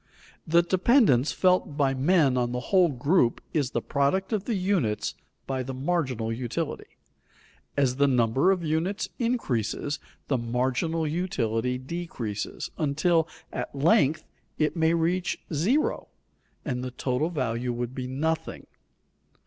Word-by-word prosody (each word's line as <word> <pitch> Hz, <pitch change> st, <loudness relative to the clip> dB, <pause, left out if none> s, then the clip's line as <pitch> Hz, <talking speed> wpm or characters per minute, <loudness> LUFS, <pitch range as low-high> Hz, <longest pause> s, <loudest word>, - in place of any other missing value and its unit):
The 170 Hz, +2 st, +5 dB
dependence 185 Hz, -, +4 dB
felt 180 Hz, -5 st, +2 dB
by 135 Hz, -2 st, +2 dB
men 140 Hz, 0 st, +3 dB
on 120 Hz, -1 st, 0 dB
the 125 Hz, -, -1 dB
whole 185 Hz, -3 st, +6 dB
group 140 Hz, 0 st, +2 dB
is 145 Hz, -5 st, +1 dB
the -, -, -2 dB
product 170 Hz, +9 st, 0 dB
of 210 Hz, -2 st, -1 dB
the 235 Hz, -, -1 dB
units 180 Hz, -, 0 dB, 0.3 s
by 130 Hz, -1 st, -2 dB
the 130 Hz, +1 st, -5 dB
marginal 130 Hz, -6 st, -1 dB
utility. 125 Hz, +7 st, -4 dB, 0.8 s
As 130 Hz, -3 st, +2 dB
the 140 Hz, 0 st, +4 dB
number 125 Hz, +5 st, +3 dB
of 185 Hz, -3 st, +2 dB
units 165 Hz, +6 st, -1 dB
increases, 145 Hz, -, -1 dB, 0.3 s
the 135 Hz, -3 st, +1 dB
marginal 130 Hz, +7 st, 0 dB
utility 125 Hz, -8 st, -1 dB
decreases, 130 Hz, -8 st, -5 dB
until 160 Hz, +2 st, +2 dB, 0.3 s
at -, -, -4 dB
length 145 Hz, +1 st, +3 dB, 0.3 s
it 155 Hz, +2 st, +1 dB
may 165 Hz, 0 st, +3 dB
reach 175 Hz, +2 st, 0 dB, 0.2 s
zero, 215 Hz, -, +1 dB, 0.6 s
and 125 Hz, -3 st, -2 dB
the 130 Hz, -, -3 dB
total 130 Hz, +4 st, -1 dB
value 125 Hz, -6 st, -2 dB
would 120 Hz, +1 st, -3 dB
be 130 Hz, -1 st, -4 dB
nothing. 155 Hz, +5 st, -2 dB
145 Hz, 135 wpm, -27 LUFS, 125-170 Hz, 0.8 s, whole